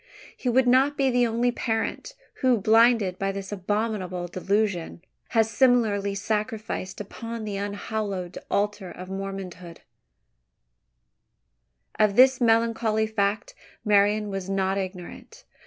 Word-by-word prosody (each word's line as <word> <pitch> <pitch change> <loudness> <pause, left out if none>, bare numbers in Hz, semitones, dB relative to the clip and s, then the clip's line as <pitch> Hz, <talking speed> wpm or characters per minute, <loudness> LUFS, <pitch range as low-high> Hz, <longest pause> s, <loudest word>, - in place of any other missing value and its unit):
He 250 - -2
would 250 +1 +3
not 265 +4 +4
be 270 -1 +2
the 245 -1 +3
only 235 +2 +1
parent, 230 - -3 0.3
who, 255 -2 +4
blinded 220 -2 +3
by 195 0 0
this 195 0 -7
abominable 195 -2 -2
delusion, 185 -1 -1 0.3
has 225 -1 +2
similarly 210 -5 +2
sacrificed 210 -1 -3
upon 230 +2 -6
the 205 -2 -4
unhallowed 200 -2 -4
altar 205 -2 -1
of 185 +1 -9
Mormondom. 190 -3 -6 2.2
Of 210 -2 +3
this 260 +1 +6
melancholy 225 -1 +2
fact 205 -1 -1 0.3
Marian 210 0 +3
was 195 -1 -5
not 195 0 0
ignorant. 190 - -8
210 Hz, 115 wpm, -25 LUFS, 195-230 Hz, 2.2 s, this